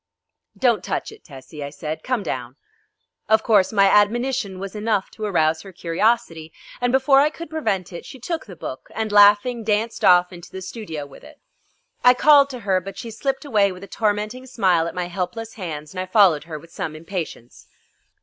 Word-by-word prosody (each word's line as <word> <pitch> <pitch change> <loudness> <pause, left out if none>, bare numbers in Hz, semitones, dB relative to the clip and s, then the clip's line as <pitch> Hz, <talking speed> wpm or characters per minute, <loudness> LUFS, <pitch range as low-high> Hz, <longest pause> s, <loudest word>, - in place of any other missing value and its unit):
"Don't 240 -4 +2
touch - - -3
it, 440 - -15
Tessie," 145 0 -10
I 140 - -5
said; 150 +2 -6
"come 250 -5 -1
down." 125 -6 -5 0.7
Of 220 0 +4
course 200 -4 +3
my 200 -2 +4
admonition 210 0 +2
was 195 +2 -7
enough 210 -2 -1
to 215 - -6
arouse 160 -5 +1
her 195 - -11
curiosity, 170 -2 -1 0.3
and 245 0 +1
before 270 +1 +4
I 290 +2 +4
could 330 0 -10
prevent 195 - -2
it 170 - -7
she 265 - -11
took 325 +4 -4
the 185 - -10
book 130 -5 -8
and, 220 -1 -2
laughing, 205 +4 +5
danced 220 +2 -1
off 180 0 +5
into 175 -1 -12
the 190 0 -7
studio 170 -8 -6
with 140 - -15
it. 300 0 -15 0.6
I 250 0 +7
called 285 +1 +6
to 250 -3 -7
her, 190 -3 +1
but 195 +1 -9
she 230 - -7
slipped 270 +6 -3
away 210 -7 +2
with 185 +1 -10
a - - -9
tormenting 215 +5 -2
smile 185 -9 +2
at - - -7
my 180 -1 -2
helpless 185 +5 -5
hands, 155 -6 -7
and 185 - -6
I 185 - -3
followed 185 -6 +4
her 160 -2 -6
with 165 +3 -15
some 160 -4 -5
impatience. 160 -7 -7
200 Hz, 200 wpm, -22 LUFS, 175-230 Hz, 0.7 s, I